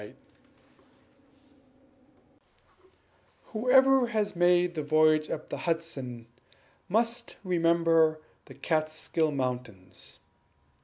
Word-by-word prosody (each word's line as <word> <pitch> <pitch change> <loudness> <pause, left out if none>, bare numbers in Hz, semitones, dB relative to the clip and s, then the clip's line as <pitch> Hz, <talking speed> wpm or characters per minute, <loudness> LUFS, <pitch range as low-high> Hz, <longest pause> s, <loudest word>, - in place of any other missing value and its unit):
] 275 +5 -34
Whoever 260 +3 +4
has 215 -4 -2
made 175 0 +2
a - - -1
voyage 155 +1 +2
up 155 - -6
the - - -5
Hudson 140 -8 -4 0.6
must 230 +3 -1
remember 165 -3 +2 0.3
the - - -14
Kaatskill 155 0 -1
Mountains. 125 -8 -6
175 Hz, 80 wpm, -28 LUFS, 155-260 Hz, 0.6 s, Whoever